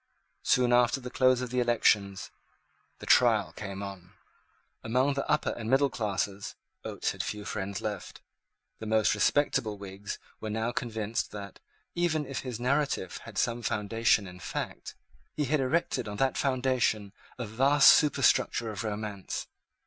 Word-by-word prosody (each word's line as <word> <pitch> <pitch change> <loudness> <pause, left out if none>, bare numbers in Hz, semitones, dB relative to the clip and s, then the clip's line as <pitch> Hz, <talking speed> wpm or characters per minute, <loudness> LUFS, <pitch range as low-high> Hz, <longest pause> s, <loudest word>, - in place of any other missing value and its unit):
Soon 125 -1 +3
after 120 +2 +4
the 125 -1 -8
close 130 -1 +3
of 125 -2 -4
the 125 - 0
elections 105 -5 +2 0.7
the - - -10
trial - - +4
came 100 -1 -6
on. 95 -2 -9 0.7
Among 130 +5 +2
the 140 - -3
upper 150 - +2
and 115 -1 -5
middle 135 +1 +3
classes 100 -3 -3 0.3
Oates - - -2
had - - -4
few 105 -1 -5
friends 100 0 -4
left. 105 -3 -5 0.6
The 110 - -6
most 110 0 +3
respectable 135 -7 +1
Whigs 100 0 -7 0.2
were 110 - -5
now 110 +2 -1
convinced 110 -2 -2
that, 100 -2 -8 0.3
even 165 -3 0
if 135 0 -4
his 125 -3 -5
narrative 135 -6 0
had - - -10
some 120 0 0
foundation 110 -1 +1
in 90 -1 -10
fact, - - -5 0.4
he 150 - 0
had 150 +3 +1
erected 135 -3 0
on 105 0 -5
that 135 +2 +1
foundation 125 -6 0 0.2
a 125 - -4
vast 135 +7 +6
superstructure 125 -5 +3
of 105 +2 -5
romance. 105 -2 -4
115 Hz, 150 wpm, -29 LUFS, 105-130 Hz, 0.7 s, vast